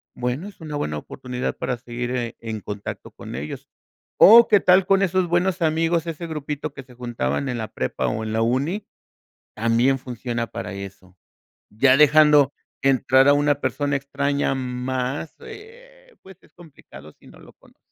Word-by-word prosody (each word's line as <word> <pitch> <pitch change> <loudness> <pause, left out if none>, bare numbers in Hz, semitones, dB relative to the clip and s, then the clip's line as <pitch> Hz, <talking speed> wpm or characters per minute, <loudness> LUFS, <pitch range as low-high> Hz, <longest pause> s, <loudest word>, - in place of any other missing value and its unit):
Bueno, 125 +9 -3
es 205 - -14
una 150 -2 -5
buena 75 - -3
oportunidad 125 - -5
para 125 - -2
seguir, 120 0 -5
eh, 120 -2 -3
en 110 -2 -6
contacto 100 +1 -7
con - - -9
ellos. 70 +3 -7 0.5
O, 230 +3 +9
¿qué 210 - +6
tal 185 0 +4
con 195 +1 +3
esos 185 -1 +1
buenos 175 +1 0
amigos, 165 +1 +1
ese 165 +1 -5
grupito 150 -1 -5
que 140 - -8
se 130 -1 -18
juntaban 120 - -3
en 125 -2 -3
la 110 -1 -4
prepa 65 - -3
o 110 - -3
en 110 - -4
la 110 0 +1
uni? 140 - -1 0.7
También 115 +4 +2
funciona 120 -1 -4
para 115 -2 -6
eso. 95 -1 -10 0.5
Ya 130 +5 +4
dejando 150 -1 +5 0.3
entrar 135 0 +4
a 145 - +7
una 145 0 +2
persona 140 +3 -1
extraña 140 0 -1
más, 130 +2 -3
eh, - - -14
pues, 190 -2 -15
es - - -25
complicado 135 - -15
si - - -24
no - - -16
lo - - -16
conoces. - - -25
135 Hz, 170 wpm, -22 LUFS, 120-160 Hz, 0.7 s, O